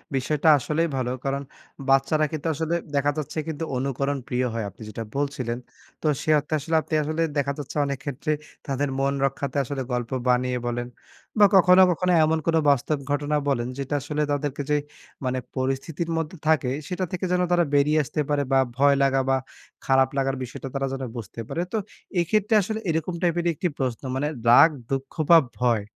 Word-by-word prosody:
বিষয়টা 150 +4 +2
আসলেই 155 +6 0
ভালো। 125 -1 -1 0.2
কারণ 140 +1 -1 0.5
বাচ্চারা 155 +3 +3
কিন্তু 155 +1 -3
আসলে 160 +3 -1 0.2
দেখা 145 +1 +2
যাচ্ছে 155 +1 -3
কিন্তু 160 0 -4
অনুকরণ 140 +2 -1
প্রিয় 125 0 0
হয়, 115 -2 -2
আপনি 115 - -19
যেটা 115 +1 -5
বলছিলেন। 135 -4 -2 0.4
তো 155 - 0
সে - - -4
অর্থে 150 +2 -6
আসলে 160 +3 -2
আপনি 155 - -9
আসলে 155 +2 -2 0.2
দেখা 140 0 +1
যাচ্ছে, 145 +1 -6
অনেক 140 -2 -3
ক্ষেত্রে 145 +2 -3 0.4
তাদের 140 +1 -1
মন 140 0 +1
রক্ষার্থে 135 0 -1
আসলে 135 +1 -4
গল্প 120 -1 -2 0.2
বানিয়ে 125 0 +2
বলেন, 120 0 -2 0.5
বা 205 - +9
কখনো, 185 0 +7
কখনো 180 +2 0
এমন 160 +1 +1
কোনো 165 -1 +4
বাস্তব 140 +2 +2
ঘটনা 145 +1 0
বলেন 120 -3 0
যেটা 140 +1 -2
আসলে 150 +2 -2
তাদেরকে 145 0 -2
যে 150 - +4 0.5
মানে 130 0 0 0.2
পরিস্থিতির 135 +6 -2
মধ্যে 165 +3 -3
থাকে, 145 -5 +3 0.2
সেটা 185 0 -2
থেকে 185 0 -2
যেন 180 0 +2
তারা 175 -1 +4
বেরিয়ে 150 +2 +4
আসতে 150 +2 -2
পারে 145 -1 +2
বা 135 - +5 0.2
ভয় 140 +1 +5
লাগা 135 0 +3
বা 135 - +4 0.5
খারাপ 135 0 +4
লাগার 135 0 +1
বিষয়টা 125 +2 -7
তারা 135 0 0
যেন 135 0 -4
বুঝতে 115 0 -8
পারে। 170 - -2
তো - - +1 0.4
এইক্ষেত্রে 210 +5 +1
আসলে 220 +3 -3
এরকম 160 +2 -1
টাইপের 175 -1 +1
একটি 180 - -1
প্রশ্ন, 125 -4 -2
মানে 145 +3 0 0.2
রাগ, 125 +7 +8 0.2
দুঃখ 135 0 -3 0.2
বা 170 - +10 0.2
ভয়, 120 -4 +2
140 Hz, 185 wpm, -25 LUFS, 135-160 Hz, 0.5 s, বা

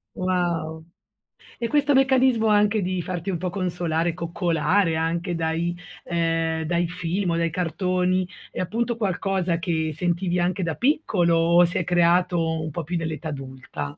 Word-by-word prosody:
Wow. 170 -3 -1 0.7
E 235 - -2
questo 290 0 +3
meccanismo 260 -4 +4
anche 210 0 +3
di 185 -1 -1
farti 180 +2 -4
un 180 - -1
po' 180 +1 -3
consolare, 175 -3 -1
coccolare 170 0 +1
anche 170 +3 -1
dai 165 +1 -1 0.3
ehm, 165 -1 0
dai 170 +1 0
film 180 +1 -2
o 165 - 0
dai 170 0 +1
cartoni 180 +2 0 0.2
è - - -6
appunto 230 +6 -1
qualcosa 190 -4 0
che 160 -2 -1
sentivi 175 +1 0
anche 180 +2 0
da 165 -2 -2
piccolo, 205 - +2
o 170 +1 +5
si 175 - -2
è 175 - +1
creato 175 -2 +2
un 155 0 -4
po' 170 +3 -4
più 175 +4 -3
nell'età 160 -1 -4
adulta? 130 -3 -7
175 Hz, 155 wpm, -24 LUFS, 165-185 Hz, 0.7 s, o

